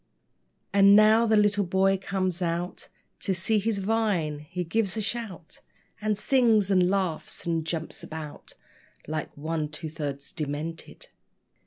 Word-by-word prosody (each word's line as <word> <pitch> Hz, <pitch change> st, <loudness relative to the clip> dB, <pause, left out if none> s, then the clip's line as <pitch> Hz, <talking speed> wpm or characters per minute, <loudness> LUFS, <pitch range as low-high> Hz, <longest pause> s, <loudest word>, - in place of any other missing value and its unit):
And 200 Hz, 0 st, +7 dB
now 215 Hz, +2 st, +6 dB
the 220 Hz, -1 st, +4 dB
little 205 Hz, -1 st, +3 dB
boy 190 Hz, +1 st, +2 dB
comes 185 Hz, -2 st, -2 dB
out 175 Hz, +1 st, -3 dB, 0.3 s
To 190 Hz, -, -1 dB
see 210 Hz, +5 st, +1 dB
his 215 Hz, +1 st, -1 dB
vine. 195 Hz, -7 st, 0 dB
He 175 Hz, +4 st, -5 dB
gives 200 Hz, +4 st, -1 dB
a -, -, 0 dB
shout, 205 Hz, -6 st, -5 dB, 0.4 s
And 210 Hz, -1 st, 0 dB
sings 220 Hz, -4 st, +3 dB
and 180 Hz, -2 st, +4 dB
laughs, 185 Hz, -5 st, -1 dB
and 165 Hz, -1 st, 0 dB
jumps 160 Hz, 0 st, -4 dB
about 155 Hz, -2 st, -8 dB, 0.5 s
Like 155 Hz, 0 st, -3 dB
one 155 Hz, 0 st, -2 dB
two 155 Hz, +1 st, -7 dB
thirds 145 Hz, -3 st, -5 dB
demented. 155 Hz, +1 st, -5 dB
185 Hz, 140 wpm, -27 LUFS, 160-210 Hz, 0.5 s, And